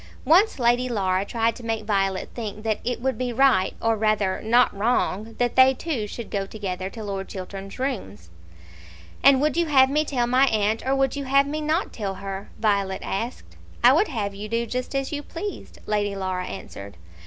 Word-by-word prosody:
Once 380 +7 +4
Lady 245 0 +2
Laura 190 -4 0
tried 225 +2 0
to - - -10
make 225 -1 -2
Violet 195 -2 0
think 215 -2 -6
that 220 -2 0
it 245 0 -2
would 260 0 -1
be 250 -1 -1
right, 240 -6 +3
or 225 0 +1
rather 215 -3 +1
not 240 +2 +3
wrong, 220 0 0
that 245 -1 0
they 260 0 +6
two 255 -8 -3
should 230 +2 -8
go 195 -1 -2
together 190 -3 -4
to 220 +2 -8
Lord 195 -2 -4
Chiltern's 195 +1 -7
rooms. 145 - -4 0.9
"And 275 -1 +6
would 300 +1 +1
you 340 -1 +1
have 265 -3 +5
me 300 +2 +2
tell 255 -5 0
my 255 +3 +4
aunt, 215 -1 +1
or 270 - +2
would 270 0 +1
you 280 -1 -4
have 275 +1 +4
me 300 +2 -3
not 315 +5 -1
tell 200 -4 -4
her?" 195 +1 -6
Violet 200 -3 0
asked. 230 +6 -5 0.3
"I - - +8
would 420 - +3
have 210 -7 -3
you 205 +2 -7
do 230 +1 0
just 250 +4 -4
as 275 0 -1
you 295 -1 -3
pleased," 385 +7 -7
Lady 205 -1 -1
Laura 185 -1 -3
answered. 100 - -9
225 Hz, 200 wpm, -24 LUFS, 200-265 Hz, 0.9 s, I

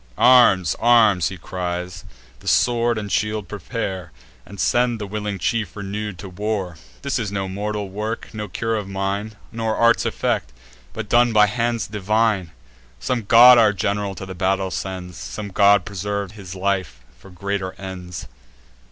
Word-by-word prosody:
"Arms! 120 -8 +5
arms!" 110 -7 +5
he 95 - -8
cries; 90 0 -5 0.3
"the - - -14
sword 120 -1 +2
and 105 -2 -5
shield 105 -1 -1
prepare, 95 -2 -5 0.4
And 100 -1 -11
send 120 +1 +2
the 105 - -4
willing 105 0 -4
chief, 105 -2 -1
renew'd, 105 -1 -5
to 95 +1 -8
war. 95 -3 -3 0.3
This 140 -2 -1
is 105 -4 -3
no 100 -1 -2
mortal 105 +1 -3
work, 105 +5 -5
no 105 -1 -5
cure 115 +5 -2
of 105 -3 -3
mine, 100 +2 -3 0.2
Nor 115 -1 -2
art's 115 0 +4
effect, - - -1 0.4
but 110 -1 -6
done 120 +2 +4
by 105 -1 +6
hands 115 +2 -1
divine. 105 -2 0 0.5
Some 120 -4 -2
god 120 +3 +8
our 110 -2 +5
general 100 0 -2
to 95 - -7
the 95 - -7
battle 95 +1 0
sends; 90 -2 -5
Some 105 -1 -6
god 100 -1 +4
preserves 100 0 -4
his 95 -4 -9
life 95 -10 -2 0.2
for 95 - -15
greater 95 +1 -3
ends." 90 -2 -8
100 Hz, 160 wpm, -21 LUFS, 95-110 Hz, 0.5 s, god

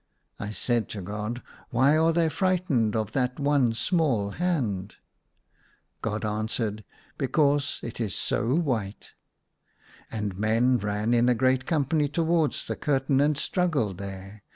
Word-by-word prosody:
I 105 - -4
said 115 +2 -1
to 105 - -5
God, 105 +5 -4
" - - -25
Why 130 +5 +4
are 160 +1 +4
they 165 0 +2
fright 185 +2 0
ened 115 -6 +2
of 110 -2 -1
that 125 -1 -1
one 140 -5 +2
small 130 - +1
hand? 115 - -1 0.5
" - - -38
God 110 0 -2
answered, 110 0 -2 0.2
" - - -31
Because 145 +1 +1
it 120 +1 -5
is 105 -4 -2
so 120 +5 0
white." 115 - -2 1.0
And 105 -4 -3
men 115 +4 +3
ran 105 +2 -1
in 120 +1 +4
a 125 - +4
great 130 +2 +2
company 150 -1 +1
towards 165 0 +1
the - - -3
curtain, 135 -1 +1
and 150 +1 +3
strugi^led 140 - 0
there. 100 +1 -8
125 Hz, 150 wpm, -27 LUFS, 105-145 Hz, 1.0 s, Why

